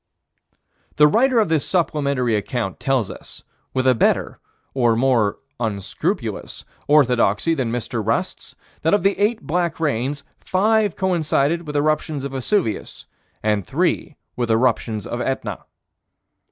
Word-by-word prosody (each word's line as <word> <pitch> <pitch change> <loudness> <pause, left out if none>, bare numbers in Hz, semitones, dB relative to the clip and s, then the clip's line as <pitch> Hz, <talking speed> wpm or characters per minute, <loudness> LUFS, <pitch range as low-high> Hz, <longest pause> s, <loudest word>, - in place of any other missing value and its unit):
The 150 - +6
writer 245 - +3
of 215 - +3
this 160 -3 +1
supplementary 140 - 0
account 105 -1 -3
tells 130 -6 0
us, - - -11 0.3
with 130 0 -1
a 130 - +6
better, 115 - +1 0.3
or 120 -4 +2
more 115 -4 +2 0.2
unscrupulous, 110 - -3 0.2
orthodoxy 130 -1 +3
than 130 -7 -1
Mr. 120 -1 -3
Rust's, 110 +2 -2 0.3
that 165 +5 +3
of 205 - -1
the 195 +1 +3
eight 215 +2 +1
black 170 +1 -1
rains, 140 -2 -1 0.2
five 210 +2 +1
coincided 170 -3 0
with 150 - -5
eruptions 150 -1 0
of 140 - -4
Vesuvius 135 - -2 0.4
and 105 -2 +1
three 165 - -1 0.2
with 120 -1 -2
eruptions 110 -2 +1
of 120 - -4
Etna. 135 +1 -3
135 Hz, 130 wpm, -21 LUFS, 115-165 Hz, 0.4 s, The